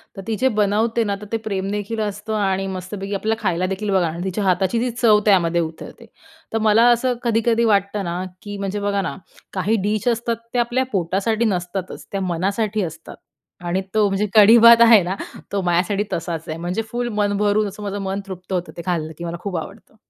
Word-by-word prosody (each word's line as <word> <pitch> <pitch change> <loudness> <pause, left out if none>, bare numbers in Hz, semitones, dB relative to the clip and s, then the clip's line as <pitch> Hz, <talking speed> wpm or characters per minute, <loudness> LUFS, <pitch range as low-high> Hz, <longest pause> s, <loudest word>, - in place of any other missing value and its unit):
तर 195 - -7
ती 225 - 0
जे 260 +4 +2
बनवते 215 +3 +2
ना 200 - 0
तर - - -7
ते 225 - +1
प्रेमदेखील 205 +2 -3
असतं 210 +1 -4
आणि 195 -2 0
मस्तपैकी 195 +2 -5
आपल्या 220 +3 0
खायला 185 -3 0
देखील 195 +3 -3
बघा 185 -4 +2
ना, 165 - -8
तिच्या 190 +2 -2
हाताची 190 +4 +1
जी 245 +2 0
चव 225 -3 +4
त्यामध्ये 175 -4 +3
उतरते. 165 +8 -7 0.5
तर - - +2
मला 225 +3 +5
असं 245 +2 +2
कधी-कधी 230 0 +2
वाटतं 200 -1 +1
ना, 175 0 -3 0.2
की 205 -1 -7
म्हणजे 200 +1 -3
बघा 200 0 0
ना, - - -4 0.4
काही 195 +4 +1
डिश 210 +2 -1
असतात, 235 0 +1 0.2
ते 245 - +1
आपल्या 240 +2 +1
पोटासाठी 200 +5 0
नसतातच, 185 -2 -3
त्या 195 - -2
मनासाठी 200 +4 -1
असतात, 160 -1 -8 0.5
आणि 180 +2 0
तो 215 -1 +3
म्हणजे 195 +1 0
कढी-भात 230 +2 +8
आहे 225 -3 +8
ना, 180 +2 -2 0.4
तो 200 - 0
माझ्यासाठी 180 +3 +1
तसाच 165 -1 -3
आहे. 155 - -4
म्हणजे 180 +6 -2
फुल 240 0 -2
मन 205 -1 +1
भरून 210 +1 +2
असं 210 +1 -8
माझं 200 0 -4
मन 195 0 -2
तृप्त 185 0 -7
होतं, 180 -1 -2
ते 170 - -4
खाल्लं 165 -3 -2
की 170 - -7
मला 170 0 -4
खूप 195 -4 -3
आवडतं. 200 +7 -9
200 Hz, 200 wpm, -21 LUFS, 185-220 Hz, 0.5 s, कढी-भात